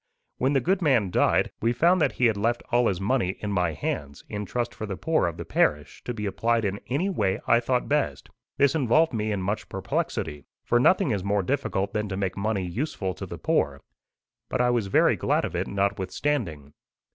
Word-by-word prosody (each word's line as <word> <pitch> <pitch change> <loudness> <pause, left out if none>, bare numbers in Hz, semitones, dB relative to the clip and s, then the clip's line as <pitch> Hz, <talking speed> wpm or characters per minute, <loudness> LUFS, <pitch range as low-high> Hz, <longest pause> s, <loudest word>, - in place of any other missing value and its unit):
When 130 +3 +2
the 135 - +3
good 190 +8 +1
man 120 - +2
died, - - +2
we 115 +2 +2
found 170 +8 +3
that - - +2
he 125 - +1
had 110 -2 +3
left 115 +4 0
all 120 0 +4
his 95 -3 0
money 100 -2 0
in 105 - -3
my 90 -4 +1
hands, 70 -1 -4
in 105 -1 -5
trust 120 +1 -2
for 110 - -6
the 95 -2 -4
poor 160 - +1
of 85 - -4
the - - -6
parish, 75 0 0
to 120 - -3
be 105 -1 -4
applied 115 +3 0
in 100 0 -2
any 145 +9 0
way 105 - 0
I 115 - +5
thought 125 +1 0
best. 150 0 -1 0.3
This 140 -1 +4
involved 155 +1 +3
me 110 -1 -1
in 100 -3 -2
much 100 +3 -3
perplexity, 75 -2 -3 0.2
for 120 - +2
nothing 180 +3 +4
is 100 -4 -1
more 100 0 +1
difficult 100 -5 -1
than 105 -1 -1
to 95 - -3
make 95 -2 -2
money 100 -1 -1
useful 95 - -3
to - - -7
the - - -7
poor. - - 0 0.7
But 130 - -1
I 125 0 +3
was 115 -5 0
very 95 - +4
glad - - +1
of - - -5
it, - - -1
notwithstanding. 100 - -2
110 Hz, 215 wpm, -26 LUFS, 95-125 Hz, 0.7 s, I